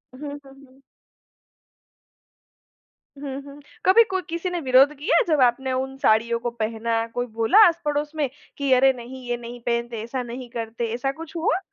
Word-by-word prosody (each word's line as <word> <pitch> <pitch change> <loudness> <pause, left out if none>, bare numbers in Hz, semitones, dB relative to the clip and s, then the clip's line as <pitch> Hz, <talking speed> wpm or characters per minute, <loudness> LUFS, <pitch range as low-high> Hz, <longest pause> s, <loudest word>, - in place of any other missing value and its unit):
हुँ, 260 - -14 0.2
हुँ, 270 - -14
हुँ। 265 +1 -23 2.4
हुँ, 275 -1 -6
हुँ। 280 +1 -12 0.3
कभी 455 +5 +7
को 380 0 0
किसी 340 +2 -3
ने 355 - -2
विरोध 265 +1 +5
किया 300 - +3
जब 305 -4 +2
आपने 255 +1 +2
उन 265 +1 -2
साड़ियों 230 -1 +2
को 240 +1 -2
पहना, 225 0 -1
कोई 245 +2 -3
बोला 225 - +1
आस 340 0 0
पड़ोस 295 0 -1
में 295 -4 0 0.3
कि, 280 -1 -1
"अरे 265 +1 +5
नहीं 255 +1 -10
ये 240 - 0
नहीं 240 0 -9
पहनते, 235 -1 -2
ऐसा 250 +2 -4
नहीं 245 +1 -8
करते।" 230 0 -4
ऐसा 270 +3 -1
कुछ 325 +3 -11
हुआ? 330 +2 +1
260 Hz, 175 wpm, -23 LUFS, 235-290 Hz, 2.4 s, कभी